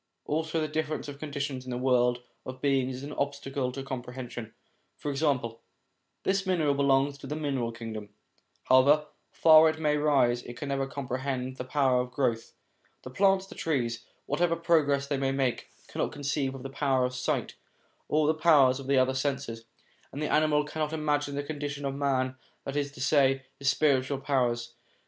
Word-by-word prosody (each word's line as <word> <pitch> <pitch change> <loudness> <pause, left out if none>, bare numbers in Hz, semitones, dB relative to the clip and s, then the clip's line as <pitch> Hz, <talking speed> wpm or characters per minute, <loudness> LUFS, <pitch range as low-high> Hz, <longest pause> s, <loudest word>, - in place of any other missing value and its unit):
Also 160 +1 -1
the 155 - 0
difference 155 0 -3
of 140 -1 -8
conditions 140 -3 -4
in 130 - -9
the 125 - -2
world 125 -1 +2 0.2
of 130 0 -8
beings 135 -2 +1
is 130 - -8
an 145 +1 -6
obstacle 140 -2 -2
to 135 +1 -6
comprehension. 125 -3 -6 0.5
For 145 - -3
example: 135 -6 -1 0.6
this 195 +1 +1
mineral 170 -6 +1
belongs 140 0 +2
to 135 - -9
the 150 - -3
mineral 135 -6 -1
kingdom; 110 -2 -7 0.5
however 140 +4 +5 0.3
far 160 0 +7
it 160 0 -4
may 150 -1 +2
rise, 135 -5 +3
it 120 0 -10
can 140 - -5
never 135 -1 -1
comprehend 130 -1 -3
the - - -4
power 130 -2 +2
of 125 - -5
growth. 125 -3 -1 0.5
The 130 - -8
plants, 195 +4 +3
the - - -12
trees, 120 -7 -1 0.2
whatever 165 +3 +1
progress 155 -5 +2
they 140 0 -1
may 135 0 0
make, 135 -3 -1 0.2
cannot - - -2
conceive 140 -1 -2
of 130 - -9
the 135 - -6
power 135 -2 +1
of 125 - -3
sight 125 0 -2 0.5
or 155 0 +2
the 155 - +3
powers 150 -5 +5
of 135 - -8
the 140 0 +3
other 130 0 +3
senses; 130 -4 -3 0.5
and 140 - -7
the 150 - -1
animal 150 -1 +3
cannot 155 +1 -3
imagine 145 -2 0
the 145 - -2
condition 145 -1 -5
of 135 - -1
man, 130 -2 0 0.3
that 135 - -5
is 145 -1 -1
to 130 - -10
say, 135 -1 +3
his 140 0 +2
spiritual 140 -2 +2
powers. 125 -4 0
140 Hz, 180 wpm, -28 LUFS, 130-150 Hz, 0.6 s, far